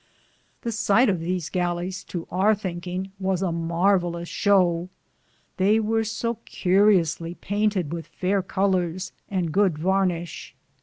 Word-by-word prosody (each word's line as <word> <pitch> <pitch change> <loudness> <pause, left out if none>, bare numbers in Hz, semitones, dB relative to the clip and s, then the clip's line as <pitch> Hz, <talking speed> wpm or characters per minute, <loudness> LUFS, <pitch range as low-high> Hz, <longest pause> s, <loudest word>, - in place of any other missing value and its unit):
The 235 - -2
sighte 225 +2 +3
of 185 -4 +1
these 175 0 -2
gallis, 180 0 -2
to 170 -2 -5
our 195 +4 +3
thinkinge, 185 -1 -5
was 190 -1 0
a 180 - 0
marvalus 170 +1 +1
show, 180 -4 +2 0.7
they 200 +4 +4
weare 225 +1 +1
so 230 +1 -3
curiusly 180 -3 +2
paynted 205 -5 0
with 165 -1 -5
fayre 195 +2 0
coUors 185 -1 -1 0.2
and 180 -5 -1
good 190 -2 +2
varnishe. 180 -3 -1
185 Hz, 125 wpm, -24 LUFS, 175-200 Hz, 0.7 s, they